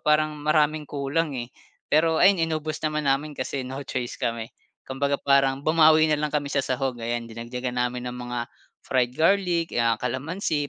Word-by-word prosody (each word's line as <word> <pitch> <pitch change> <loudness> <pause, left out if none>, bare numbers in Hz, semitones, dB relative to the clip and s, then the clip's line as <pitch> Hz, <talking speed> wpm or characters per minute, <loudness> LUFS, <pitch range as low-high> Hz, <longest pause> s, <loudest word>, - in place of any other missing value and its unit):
parang 150 0 +2
maraming 150 0 +2
kulang, 145 +2 -1
eh. 120 -1 -5 0.4
Pero 160 +2 +3
ayun, 195 +2 +6
inubos 155 -1 -3
naman 150 0 -1
namin 140 +3 +1
kasi 135 +1 -3
no 130 +2 -6
choice 125 -2 -4
kami. 115 0 -2 0.4
Kumbaga 140 +1 -1
parang 135 -1 +3
bumawi 155 0 +5
na 155 - +3
lang 150 - 0
kami 145 -1 -1
sa 140 - +2
sahog, 130 0 -1
ayan, 120 +1 -2
dinagdagan 125 +2 -5
namin 125 0 -2
ng 125 - -6
mga 120 -1 -4 0.4
fried 125 -2 +1
garlic, 170 -1 +2
'yan 115 -1 +2
kalamansi, 145 - -2
140 Hz, 170 wpm, -25 LUFS, 125-155 Hz, 0.4 s, ayun